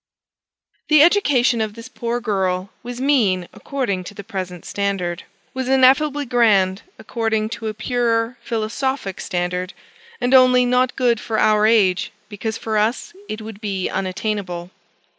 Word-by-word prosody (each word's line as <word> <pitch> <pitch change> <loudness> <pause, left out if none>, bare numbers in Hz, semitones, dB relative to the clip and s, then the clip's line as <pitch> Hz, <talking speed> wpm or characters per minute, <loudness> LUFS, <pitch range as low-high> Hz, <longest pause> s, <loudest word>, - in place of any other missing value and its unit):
The 305 -1 +6
education 280 - +3
of 215 -1 -3
this 230 +1 -9
poor 240 -1 -3
girl 190 -4 -1
was 245 0 -7
mean 220 -11 +2
according 240 -10 -3
to 205 - -9
the 200 - -8
present 185 -4 -6
standard: 195 -4 -2 0.3
was 260 -1 -3
ineffably 270 +2 +4
grand, 205 -6 +3 0.2
according 220 -2 -2
to 230 -1 -5
a 215 - -4
purer 230 +1 0
philosophic 230 -1 -3
standard; 180 +1 -3 0.5
and 245 +1 0
only 255 -1 +6
not 250 0 +2
good 240 -3 +2
for 220 -1 -3
our 215 0 +4
age, 200 -5 +3 0.2
because 220 +1 -4
for 220 -2 -1
us 220 +9 -1 0.2
it 215 0 -5
would 215 -1 -9
be 195 -4 -2
unattainable. 185 -2 -3
220 Hz, 140 wpm, -20 LUFS, 195-250 Hz, 0.5 s, The